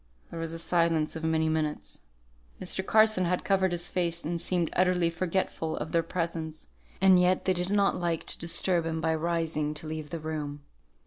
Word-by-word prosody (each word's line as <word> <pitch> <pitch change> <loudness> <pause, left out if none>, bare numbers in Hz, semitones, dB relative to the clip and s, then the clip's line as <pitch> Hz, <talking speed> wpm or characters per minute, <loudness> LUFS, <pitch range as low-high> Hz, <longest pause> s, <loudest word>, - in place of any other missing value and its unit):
There 165 - -6
was 165 0 -3
a 165 - -5
silence 165 -2 +1
of 160 - -6
many 160 0 +1
minutes. 155 -1 -2 0.6
Mr. 190 - -2
Carson 215 -2 +4
had 180 +1 0
covered 190 -2 +2
his 175 0 0
face, 170 -2 -1
and 170 +2 -2
seemed 175 -3 0
utterly 180 -2 +2
forgetful 170 -2 -2
of 155 - -4
their 170 - +3
presence; 165 -2 -4 0.3
and 190 -1 +6
yet 180 +1 +2
they 185 - +3
did 180 0 -2
not 200 -1 +2
like 170 -2 -1
to - - 0
disturb 170 0 +1
him 160 0 -2
by 160 0 +1
rising 160 -2 -1
to 150 - -1
leave 155 -1 -5
the 165 - -4
room. 150 -2 -5
165 Hz, 190 wpm, -28 LUFS, 160-180 Hz, 0.6 s, and